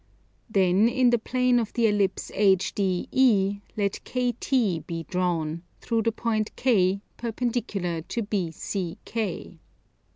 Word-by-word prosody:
Then 195 +1 +4
in 245 0 +3
the 240 - +3
plane 250 +1 +2
of 225 -2 -3
the 235 -2 +2
Ellipse 205 -3 +1
HDE 200 +2 +2 0.2
let 200 -1 0
KT 245 - 0
be 165 -1 -4
drawn, 170 -3 -1 0.2
through 230 -1 0
the 230 - +1
point 220 -1 -2
K, 195 -6 +2 0.2
perpendicular 225 -7 -2
to 230 +8 -3
BCK. 185 0 -4
205 Hz, 110 wpm, -26 LUFS, 185-235 Hz, 0.2 s, Then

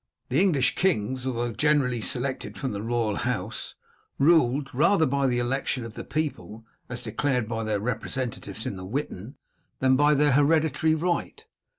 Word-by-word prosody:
The 135 +7 +2
English 145 -10 +3
kings, 130 - 0
although 120 -1 -1
generally 125 -1 +2
selected 130 +4 -2
from 135 - -3
the 100 -1 -4
royal 115 -2 -1
house, - - -3 0.4
ruled 140 -3 +3
rather 160 +6 +4
by 140 0 +1
the 125 -1 +1
election 125 0 -1
of 115 - -8
the - - -7
people 115 - -4 0.2
as 125 -1 -5
declared 125 +1 -1
by 115 0 -3
their 105 -1 0
representatives 115 -2 -4
in 100 - -4
the 95 - -7
Witan 125 0 -4 0.4
than 130 0 +3
by 145 +2 +4
their 145 +1 +3
hereditary 155 +2 +3
right. 175 - -2
130 Hz, 160 wpm, -26 LUFS, 115-150 Hz, 0.4 s, rather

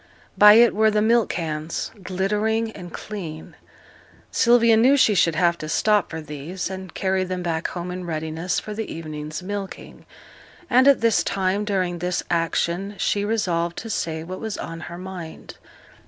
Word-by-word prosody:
By 210 0 +9
it 235 +1 +6
were 220 +1 +4
the 215 0 +1
milk 230 0 +3
cans, 160 -1 -3
glittering 210 +4 -1
and 180 -5 -10
clean. 165 -7 -7 0.8
Sylvia 235 -1 +5
knew 255 +6 +5
she 255 -5 +4
should 165 -4 +3
have 170 0 +2
to 155 - -6
stop 210 +5 +2
for 160 -1 -5
these, 155 +6 -6
and 190 -2 -7
carry 190 -1 0
them 185 -1 -4
back 165 -1 -1
home 180 0 -5
in 180 0 -5
readiness 160 +2 -2
for 215 - -7
the 220 +1 -5
evening's 155 0 -6
milking; 200 0 -7 0.6
and 255 +2 +5
at 280 -4 +5
this 230 -2 +3
time, 195 +2 0
during 185 -4 -1
this 180 +1 -1
action, 170 +3 -1
she 205 - 0
resolved 175 -6 -1
to 225 - -5
say 160 -5 -2
what 185 +3 -7
was 220 -2 -4
on 165 0 -6
her 170 - -8
mind. 180 -3 -9
185 Hz, 170 wpm, -23 LUFS, 170-210 Hz, 0.8 s, By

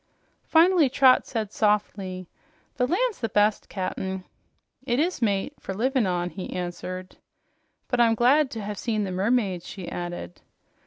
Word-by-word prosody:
Finally 335 -3 +5
Trot 260 0 +5
said 220 -4 -3
softly, 200 -4 -1 0.5
"The 250 - +2
land's 450 - 0
the 225 - -2
best, 210 +1 +2
Cap'n." 190 -1 -4 0.6
"It 250 -1 0
is, 345 -1 0
mate, 205 +4 0
for 190 - -6
livin' 255 0 +1
on," 175 -1 -1
he 190 - -7
answered. 180 +1 -5 0.7
"But 245 -1 +1
I'm 230 -1 +4
glad 265 +5 +4
to 225 -4 -6
have 205 -1 -5
seen 215 -3 -1
the 190 - -3
mermaids," 195 -2 0
she 185 -4 -8
added.. 175 - -6
210 Hz, 150 wpm, -25 LUFS, 185-250 Hz, 0.7 s, Finally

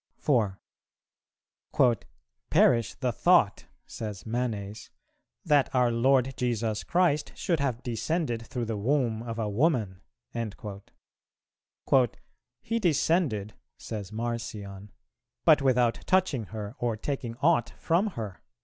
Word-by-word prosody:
4. 110 -9 +1 1.9
"Perish 115 -2 +3
the 130 -2 -1
thought," 170 - +3 0.2
says 105 -4 -7
Manes, 110 -3 -3 0.6
"that 145 -5 +4
our 125 -1 +4
Lord 130 +2 +3
Jesus 115 -3 -1
Christ 170 -4 +1
should 170 -5 0
have 130 -4 -1
descended 120 0 -2
through 120 -2 -3
the 110 -1 -3
womb 120 -1 +1
of 115 -1 -5
a 110 -2 -1
woman." 105 - +1 2.6
"He 230 0 -1
descended," 150 - +1 0.2
says 105 -3 -6
Marcion, 110 -4 -5 0.5
"but 155 -3 +6
without 125 -3 +2
touching 180 - +2
her 105 0 -6
or 120 -2 -1
taking 120 -1 -4
aught 130 -3 +2
from 175 +6 +1
her." 105 -5 -5
120 Hz, 105 wpm, -28 LUFS, 110-140 Hz, 2.6 s, but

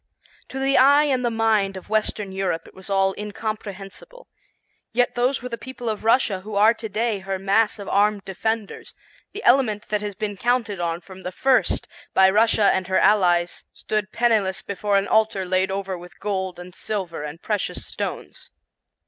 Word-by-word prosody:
To 265 - -7
the 270 0 +3
eye 285 +3 +6
and 265 -4 0
the 240 - +2
mind 220 -4 +1
of 185 - -11
western 210 -2 -1
Europe 190 -3 -2
it - - -16
was 190 +1 -10
all 195 -1 +2
incomprehensible. 210 - -7 0.7
Yet 245 +1 +2
those 250 +1 0
were 250 - -4
the 235 -1 -5
people 245 +1 -6
of 215 -1 -4
Russia 225 -4 +3
who 210 +2 -8
are 215 +3 +6
to 225 -1 -7
day 220 0 -1
her 190 0 -3
mass 200 +4 +2
of 200 - -8
armed 205 0 +2
defenders; 215 +2 -4 0.4
the 425 - -7
element 225 -5 +3
that 210 -1 0
has 205 -1 -5
been 205 0 -4
counted 230 -3 0
on 170 0 -2
from 190 +1 -13
the 180 - -5
first 260 +7 +1 0.3
by 190 0 +6
Russia 215 0 +4
and 185 -1 -1
her 190 - +1
allies 180 -4 +3
stood 210 -1 -3
penniless 215 -5 +1
before 200 0 0
an 195 0 0
altar 220 -3 +2
laid 185 +1 +1
over 195 -1 -3
with 175 +1 -12
gold 190 -3 -3
and 180 0 -10
silver 190 -6 -4
and 150 +3 -8
precious 210 -2 -2
stones. - - -6
205 Hz, 180 wpm, -23 LUFS, 190-225 Hz, 0.7 s, eye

